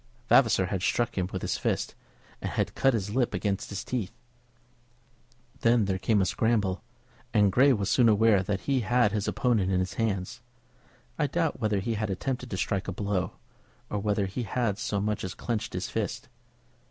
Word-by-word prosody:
Vavasor 115 -7 +5
had 95 0 -3
struck 120 +5 0
him 90 -1 -1
with 95 - -4
his - - -1
fist, - - -1 0.5
and - - -2
had - - -1
cut 135 -2 +3
his 105 -1 -3
lip 125 -1 +1
against 100 -2 -2
his 100 - -4
teeth. 115 -7 -4 1.4
Then 115 -2 +3
there 95 -1 -1
came 105 -1 +2
a - - +1
scramble, 105 -2 +1 0.5
and 105 -2 +5
Grey 135 +8 +5
was 100 -6 0
soon 120 +1 +4
aware 105 -2 +4
that 95 +1 -2
he 135 -2 +1
had 120 -1 +2
his 105 -1 -1
opponent 115 -8 +1
in 90 - +2
his 90 0 -2
hands. 110 +2 -2 0.8
I 150 - +2
doubt 165 +1 -1
whether 105 -3 +1
he 115 +3 -1
had 110 -1 -2
attempted 125 +6 -3
to 95 - -3
strike 100 0 -1
a - - -1
blow, 100 -3 -2 0.6
or 105 - -1
whether 100 -1 0
he 95 +6 -4
had 110 -2 -1
so 105 -2 -1
much 105 +1 -1
as 95 - -4
clenched 110 -2 -3
his 90 +1 -3
fist. 110 +1 -3
105 Hz, 190 wpm, -28 LUFS, 95-120 Hz, 1.4 s, Vavasor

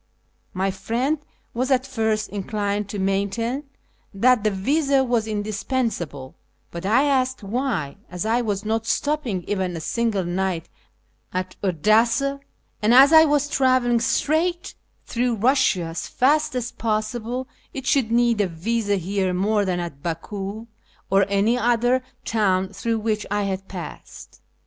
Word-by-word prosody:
My 190 +1 -1
friend 235 +10 -1 0.3
was 255 +3 -1
at 260 -1 +2
first 220 -5 -1
inclined 205 0 -2
to 205 - -4
maintain 200 +8 -1 0.5
that 245 +2 +4
the 215 - +3
visa 275 +7 +2
was 240 -3 0
indispensable, 205 - -3 0.4
but 170 +2 -5
I 230 +7 +4
asked 260 -4 +1
why, 215 - -2
as 180 +3 -4
I 230 +2 +2
was 205 -3 -2
not 225 +1 -1
stopping 270 -10 -1
even 185 -3 -2
a - - -4
single 220 +3 -1
night 175 -1 -2 0.6
at 185 0 -3
Odessa, 225 - +2 0.4
and 220 +3 +4
as 275 +4 +8
I 320 0 +9
was 290 -1 +2
travelling 255 -4 +2
straight 315 +9 0 0.3
through 240 -1 0
Eussia 215 -8 +2
as 165 - -5
fast 300 +2 +2
as 245 0 -2
possible, 230 +3 -2 0.2
it 265 -1 -6
should 255 -6 +2
need 235 -2 +3
a 200 - +1
visa 205 +5 -1
here 190 0 -1
more 205 +2 +1
than 180 -2 -1
at 170 -5 -6
Baku 195 +6 -5 0.5
or 195 0 +4
any 205 +5 +2
other 245 +2 +2 0.2
town 190 -4 +1
through 225 +4 -2
which 215 -1 -2
I 205 0 0
had 195 -1 -3
passed. 180 -4 -9
220 Hz, 145 wpm, -23 LUFS, 195-250 Hz, 0.6 s, I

